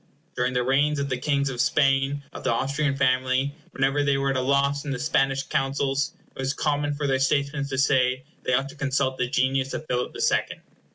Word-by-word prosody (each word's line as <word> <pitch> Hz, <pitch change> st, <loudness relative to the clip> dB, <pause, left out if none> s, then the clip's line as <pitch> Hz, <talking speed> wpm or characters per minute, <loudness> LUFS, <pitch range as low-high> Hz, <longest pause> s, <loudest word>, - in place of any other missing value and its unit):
During 125 Hz, +1 st, 0 dB
the 125 Hz, -1 st, +1 dB
reigns 145 Hz, +4 st, +2 dB
of 140 Hz, 0 st, -2 dB
the 130 Hz, -, -1 dB
kings 140 Hz, 0 st, 0 dB
of 125 Hz, -2 st, -1 dB
Spain 135 Hz, +1 st, +2 dB
of -, -, -8 dB
the -, -, +1 dB
Austrian 140 Hz, +4 st, 0 dB
family, 130 Hz, +1 st, +1 dB, 0.2 s
whenever 135 Hz, +2 st, +1 dB
they 140 Hz, -1 st, +2 dB
were 135 Hz, 0 st, 0 dB
at -, -, -2 dB
a 130 Hz, -, +1 dB
loss 140 Hz, +1 st, +1 dB
in 150 Hz, -, -6 dB
the 135 Hz, -, -2 dB
Spanish 135 Hz, -1 st, +1 dB
councils, 135 Hz, 0 st, -1 dB, 0.2 s
it -, -, -15 dB
was 135 Hz, +1 st, -1 dB
common 145 Hz, -1 st, 0 dB
for 145 Hz, 0 st, -3 dB
their 135 Hz, -1 st, +1 dB
statesmen 140 Hz, +1 st, 0 dB
to 135 Hz, -1 st, -4 dB
say 130 Hz, -2 st, +2 dB
that -, -, -35 dB
they 130 Hz, -, 0 dB
ought 135 Hz, +2 st, 0 dB
to -, -, -12 dB
consult 135 Hz, -2 st, -1 dB
the 125 Hz, -1 st, 0 dB
genius 130 Hz, 0 st, 0 dB
of 155 Hz, -, -5 dB
Philip 125 Hz, -3 st, -1 dB
the -, -, -6 dB
Second. -, -, 0 dB
135 Hz, 225 wpm, -25 LUFS, 130-140 Hz, 0.2 s, reigns